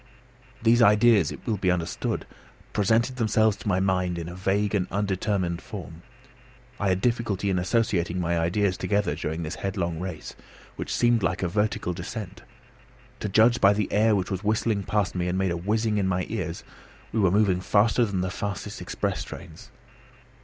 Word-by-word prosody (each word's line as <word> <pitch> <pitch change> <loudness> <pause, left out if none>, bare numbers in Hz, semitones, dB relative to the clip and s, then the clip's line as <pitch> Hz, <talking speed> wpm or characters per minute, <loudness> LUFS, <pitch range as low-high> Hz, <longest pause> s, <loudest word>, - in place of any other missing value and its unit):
These 120 +1 +5
ideas, 105 -5 +5
it - - -10
will 110 - 0
be 95 -1 0
understood, 85 -2 -1 0.5
presented 115 +5 +2
themselves 110 -2 +2
to - - -9
my 95 -2 +2
mind 90 -2 0
in 85 -1 -5
a 85 - -7
vague 95 +3 0
and 95 -3 +1
undetermined 95 -3 -1
form. 85 -6 -9 0.8
I 100 - +1
had 95 0 +1
difficulty 115 -5 0
in 90 - +1
associating 90 -3 0
any 85 -1 0
ideas 90 +3 +1
together 100 +1 0
during 80 +2 -3
this 80 +3 -5
headlong 90 -4 -2
race, 90 -3 -6 0.4
which - - -5
seemed 120 -1 +3
like 90 0 -1
a - - +2
vertical 105 -1 -1
descent. 95 +1 -7 0.8
To 105 - -3
judge 115 +5 +4
by 100 0 +6
the 105 -1 -2
air 110 +1 +4
which 95 -1 -2
was 95 +1 -3
whistling 110 0 +1
past 105 0 0
me 90 -1 -1
and 90 +1 -1
made 95 -1 +1
a - - -1
whizzing 105 +4 0
in 95 - +1
my 95 -1 0
ears, - - -4 0.5
we 110 - -1
were 95 -3 +4
moving 95 -2 +2
faster 105 +5 +3
than 100 -5 -1
the 95 0 -2
fastest 100 -2 -5
express - - -2
trains. - - -11
100 Hz, 180 wpm, -26 LUFS, 90-105 Hz, 0.8 s, by